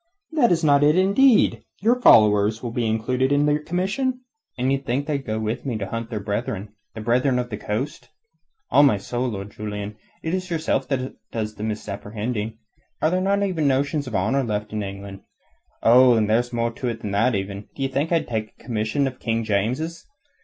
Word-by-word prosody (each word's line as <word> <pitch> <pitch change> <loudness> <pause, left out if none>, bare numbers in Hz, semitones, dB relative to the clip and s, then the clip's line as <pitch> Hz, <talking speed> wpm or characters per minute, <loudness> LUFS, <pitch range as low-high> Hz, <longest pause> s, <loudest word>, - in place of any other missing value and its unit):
"That 295 - +3
is 170 -1 +2
not 145 -1 +5
intended. 195 - +4 0.2
Your 240 +4 +2
followers 105 - +5
will 120 - -3
be 115 -1 -1
included 125 +4 0
in 145 +1 +3
your 150 0 +2
commission." 200 - -1 0.4
"And 125 +1 0
d' - - +2
ye 135 - +3
think 135 +1 -2
they'll 145 -2 -1
go 110 -4 -3
with 110 +1 -3
me 125 -5 -2
to 100 - -3
hunt 115 +2 -5
their 110 -3 -3
brethren 105 0 -3 0.3
the 110 - -6
Brethren 125 +3 +2
of 125 -1 -3
the 105 - -3
Coast? 110 +8 -4 0.6
On 145 +2 +7
my 105 - +2
soul, 120 +6 -3
Lord 100 -2 -6
Julian, 105 0 -5 0.3
it 160 - -2
is 185 0 -2
yourself 155 -5 0 0.4
does 110 -2 -3
the 105 - -8
misapprehending. 110 +1 -4 0.4
Are 155 - +2
there 185 +1 +1
not 200 +1 +1
even 170 -7 0
notions 140 +1 0
of 120 - -4
honour 110 +9 +1
left 105 -2 -3
in 105 - -1
England? 100 0 -7 0.6
Oh, 125 +1 +7
and 110 -2 +2
there's 120 +3 +1
more 115 -1 0
to 125 +2 -5
it 115 -2 -3
than 105 - -4
that, 115 +4 +2
even. 100 +1 -4
D'ye 135 -1 -1
think 140 +5 -1
I 165 -1 +3
could - - -11
take 110 -2 -3
a - - -18
commission 115 +4 -1
of 130 -1 -4
King 115 -1 -1
James's? 125 +11 -2
120 Hz, 205 wpm, -23 LUFS, 105-145 Hz, 0.6 s, On